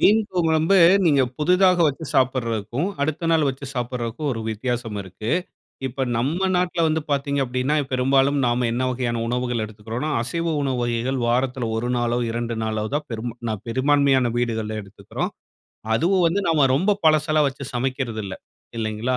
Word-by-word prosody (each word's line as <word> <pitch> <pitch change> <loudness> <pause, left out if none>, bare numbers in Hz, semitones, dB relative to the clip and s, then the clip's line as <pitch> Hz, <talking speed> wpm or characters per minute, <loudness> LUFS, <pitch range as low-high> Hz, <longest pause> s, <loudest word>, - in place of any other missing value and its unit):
மீன் 215 +2 +6
குழம்பு, 165 +1 +2 0.3
நீங்க 145 -5 +4 0.2
புதிதாக 180 +4 +4
வச்சு 150 +2 -2
சாப்பிடுறதுக்கும், 125 - 0
அடுத்த 155 +3 -1
நாள் 160 -2 +3
வச்சு 135 +1 -5
சாப்பிட்றதுக்கும் 125 +2 -3
ஒரு 115 - -4
வித்தியாசம் 115 0 -3
இருக்கு. 95 +4 -6 0.6
இப்ப 130 +1 -2
நம்ம 160 +11 0
நாட்ல 180 -2 +1
வந்து 155 0 +1
பார்த்தீங்க 140 0 0
அப்பிடின்னா, 130 +3 -1 0.2
பெரும்பாலும் 135 +2 +2
நாம 120 0 +1
என்ன 125 +2 0
வகையான 120 -2 -2
உணவுகள் 120 -1 -1
எடுத்துக்கிறோன்னா, 110 +7 -5
அசைவ 165 +9 -2
உணவு 135 -3 -1
வகைகள் 120 +2 -1
வாரத்தில 125 0 0
1 120 +2 -2
நாளோ! 120 0 0
2 115 0 -2
நாளோ 110 -1 -1
தான் 150 0 -1
பெருமா 115 0 -4
பெரும்பான்மையான 135 0 +3
வீடுகள் 110 -3 -1
எடுத்துக்குறோம். 100 -1 -5 0.6
அதுவும் 180 +9 +2
வந்து 175 +5 +1
நாம் 155 -4 +4
ரொம்ப 195 +8 +2
பழசெல்லாம் 155 -1 +4
வச்சு 135 +1 -8
சமைக்கிறது 125 -3 -2
இல்ல. 95 -1 -5 0.4
இல்லேங்களா! 110 +3 -1
130 Hz, 145 wpm, -23 LUFS, 120-150 Hz, 0.6 s, மீன்